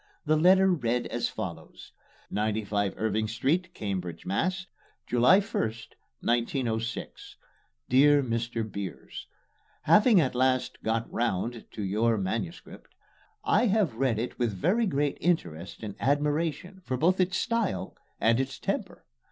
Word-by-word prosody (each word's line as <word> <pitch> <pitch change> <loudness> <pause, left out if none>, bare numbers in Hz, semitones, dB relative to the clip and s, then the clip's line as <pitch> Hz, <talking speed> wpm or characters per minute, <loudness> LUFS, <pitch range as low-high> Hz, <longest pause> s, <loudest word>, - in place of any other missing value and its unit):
The 155 +1 +3
letter 190 +4 +5
read 125 -6 0
as - - -2
follows: - - -7 0.4
95 105 -2 -1
IRVING 110 0 0
ST., 165 +10 0
CAMBRIDGE, 90 -5 -4
MASS. 185 - -1 0.4
July 125 +11 +5
1, 200 - -2
1906. 115 - -3 0.5
DEAR 145 +3 +5
MR. 115 -2 -2
BEERS: 100 -3 -7 0.6
Having 210 -1 +6
at 130 - 0
last 130 0 0
"got 115 +1 0
round" 115 0 -1
to 105 - -6
your 110 +4 +1
MS., 95 -2 -3 0.8
I 230 +4 +3
have 200 - +2
read 120 -1 0
it 120 +4 -4
with 120 -3 +1
very 205 - +1
great 145 -3 -1
interest 90 - -2
and 105 -2 -5
admiration 150 +6 -1
for 130 - -2
both 180 +8 +2
its 185 0 +2
style 230 - -1 0.2
and 115 +2 +3
its 135 -1 -2
temper. - - -4
125 Hz, 125 wpm, -28 LUFS, 110-165 Hz, 0.8 s, Having